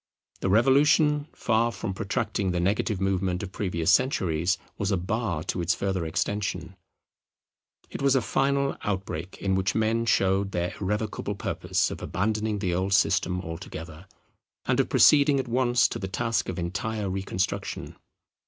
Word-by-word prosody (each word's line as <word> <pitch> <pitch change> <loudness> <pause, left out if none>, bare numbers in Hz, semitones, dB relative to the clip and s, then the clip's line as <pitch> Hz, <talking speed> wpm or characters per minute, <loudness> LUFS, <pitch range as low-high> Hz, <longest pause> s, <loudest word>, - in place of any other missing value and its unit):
The 95 - -1
Revolution, 145 +6 +4
far 115 +1 +1
from 100 -2 -4
protracting 105 0 -2
the 90 -1 0
negative 100 +2 0
movement 95 -1 0
of 95 - -6
previous 90 -5 0
centuries, 90 - +2 0.2
was 100 -3 0
a 95 - +2
bar 90 -3 -2
to 90 - -2
its 85 0 +1
further 95 -4 -2
extension. 95 0 -2 1.2
It - - -6
was 140 -1 +3
a 130 - +3
final 140 +3 +1
outbreak 95 -3 -4
in 95 -1 -1
which 95 0 0
men 115 +1 +1
showed 95 -1 +2
their 90 +1 -1
irrevocable 105 +1 -2
purpose - - -1
of - - -7
abandoning 110 +2 -1
the 95 -3 -1
old 95 +2 0
system 90 -2 +2
altogether, 80 0 -8 0.6
and - - +1
of - - +2
proceeding 140 -1 +5
at 130 - -3
once 120 0 +3
to - - -5
the 95 - -4
task 115 +3 -1
of 95 - -4
entire 105 +4 -3
reconstruction. 95 +1 -3
100 Hz, 155 wpm, -26 LUFS, 90-115 Hz, 1.2 s, proceeding